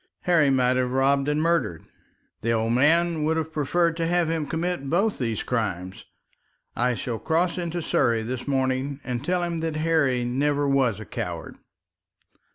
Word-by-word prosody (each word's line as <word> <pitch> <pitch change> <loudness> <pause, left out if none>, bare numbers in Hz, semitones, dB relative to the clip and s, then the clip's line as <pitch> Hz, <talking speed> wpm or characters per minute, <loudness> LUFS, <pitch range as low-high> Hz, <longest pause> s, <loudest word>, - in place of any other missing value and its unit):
Harry 165 -5 +3
might 130 -1 +2
have 125 -1 +1
robbed 135 +2 +2
and 150 +1 +1
murdered. 165 - 0 0.6
The 115 - 0
old 115 0 +1
man 160 +4 +3
would 160 +1 +1
have 160 0 -3
preferred 170 +4 +1
him 165 - -7
to 165 -1 0 0.3
have 155 -3 -3
committed 165 -3 -2
both 195 +7 +1
these 115 -4 -2
crimes. 95 -6 -3 0.7
I 125 +1 +1
shall 115 +1 -4
cross 170 - 0
into 170 -1 -3
Surrey 115 -5 +1
this 125 +3 -5
morning 135 0 0
and 125 0 -4
tell 180 +3 0
him 170 -1 -2
that 160 -1 -2
Harry 155 -6 +1
never 145 +3 0
was 130 -6 +2
a 110 - -8
coward." - - -6
140 Hz, 165 wpm, -25 LUFS, 125-165 Hz, 0.7 s, Harry